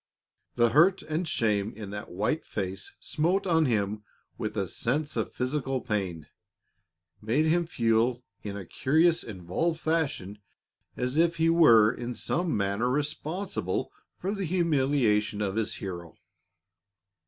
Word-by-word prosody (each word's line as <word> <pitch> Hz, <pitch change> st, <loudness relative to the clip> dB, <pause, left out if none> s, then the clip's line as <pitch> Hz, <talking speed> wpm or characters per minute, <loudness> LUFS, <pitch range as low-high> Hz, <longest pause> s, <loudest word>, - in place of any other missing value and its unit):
The 120 Hz, -1 st, +4 dB
hurt 175 Hz, +9 st, +4 dB
and 155 Hz, +3 st, -2 dB
shame 105 Hz, -6 st, 0 dB
in 105 Hz, -2 st, -7 dB
that 105 Hz, 0 st, -6 dB
white 105 Hz, -, -1 dB
face 95 Hz, +1 st, -5 dB
smote 175 Hz, +6 st, 0 dB
on 160 Hz, -4 st, +3 dB
him 105 Hz, -2 st, 0 dB, 0.3 s
with -, -, -4 dB
a -, -, +1 dB
sense 145 Hz, +5 st, -2 dB
of -, -, -1 dB
physical 130 Hz, 0 st, -1 dB
pain, 95 Hz, -9 st, -3 dB, 1.0 s
made 120 Hz, +9 st, +1 dB
him 170 Hz, +1 st, +2 dB
feel 115 Hz, -2 st, +1 dB, 0.2 s
in 100 Hz, -1 st, -5 dB
a 100 Hz, -, -7 dB
curious, 160 Hz, -, +2 dB
involved 110 Hz, -, -2 dB
fashion 140 Hz, -, -1 dB, 0.6 s
as 125 Hz, +3 st, -1 dB
if 170 Hz, 0 st, +3 dB
he 165 Hz, 0 st, +3 dB
were 115 Hz, -11 st, +6 dB
in 120 Hz, 0 st, -5 dB
some 175 Hz, -4 st, -1 dB
manner 100 Hz, +4 st, 0 dB
responsible 150 Hz, -, -2 dB, 0.3 s
for 195 Hz, +3 st, -2 dB
the 200 Hz, -2 st, -3 dB
humiliation 135 Hz, -, +1 dB
of 100 Hz, -2 st, -1 dB
his 110 Hz, -1 st, -1 dB
hero. 85 Hz, -4 st, -7 dB
125 Hz, 135 wpm, -28 LUFS, 105-160 Hz, 1.0 s, were